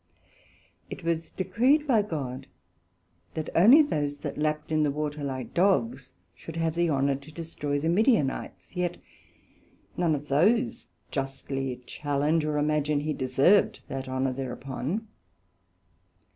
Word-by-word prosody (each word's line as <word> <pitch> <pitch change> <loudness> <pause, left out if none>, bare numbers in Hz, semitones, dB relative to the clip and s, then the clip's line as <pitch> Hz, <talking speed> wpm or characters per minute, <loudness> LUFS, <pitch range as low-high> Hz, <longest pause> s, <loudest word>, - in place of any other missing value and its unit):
It 195 - -8
was 165 -1 -1
decreed 260 +10 +2
by 240 -7 +4
God, 135 -9 -5 0.9
that 160 -1 -4
only 240 - +8
those 145 - -2
that - - -5
lapt 150 +1 -1
in 155 0 +2
the 150 - +3
water 150 0 -3
like 130 -2 -4
Dogs, 130 -9 +1 0.2
should 165 - -10
have 165 -1 0
the 170 0 +1
honour 140 -1 +2
to 140 +3 -14
destroy 150 -3 -3
the 155 - -2
Midianites; 190 - +1
yet 180 -1 0
could - - -19 1.0
none 170 -3 +2
of 145 +1 -6
those 225 - +2 0.2
justly 135 -2 -4
challenge, 145 +4 0
or 150 -1 -1
imagine 150 0 +1
he 155 +1 -1
deserved 135 +10 +3
that 135 -1 -5
honour 130 0 0
thereupon. 135 - -4
150 Hz, 135 wpm, -27 LUFS, 135-170 Hz, 1.0 s, only